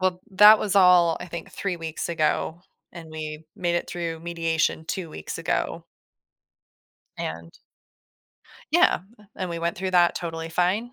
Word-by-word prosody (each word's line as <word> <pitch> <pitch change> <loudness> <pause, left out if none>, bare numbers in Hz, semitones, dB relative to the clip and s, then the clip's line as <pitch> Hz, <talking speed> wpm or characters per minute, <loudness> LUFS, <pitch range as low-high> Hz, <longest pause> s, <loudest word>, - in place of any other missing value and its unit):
Well, 185 -1 0
that 210 +3 +8
was 200 -1 -1
all 180 -3 +6
I - - -6
think, 170 -1 -8
3 195 -3 -3
weeks 160 0 -5
ago, 165 +1 -1 0.3
and 165 -2 -10
we 155 0 -6
made 175 -1 -1
it - - -3
through 165 -2 -4
mediation 165 -1 -1
2 170 -1 -4
weeks 80 - -7
ago. - - -2 1.3
And 85 +1 -5 1.2
Yeah, - - +4 0.2
m 210 - -19
and 185 -1 -4
we 170 - -3
went 170 0 -2
through 190 +1 -3
that 175 -1 +4
totally 165 -1 -5
fine, 185 +8 0
170 Hz, 155 wpm, -25 LUFS, 165-180 Hz, 1.3 s, that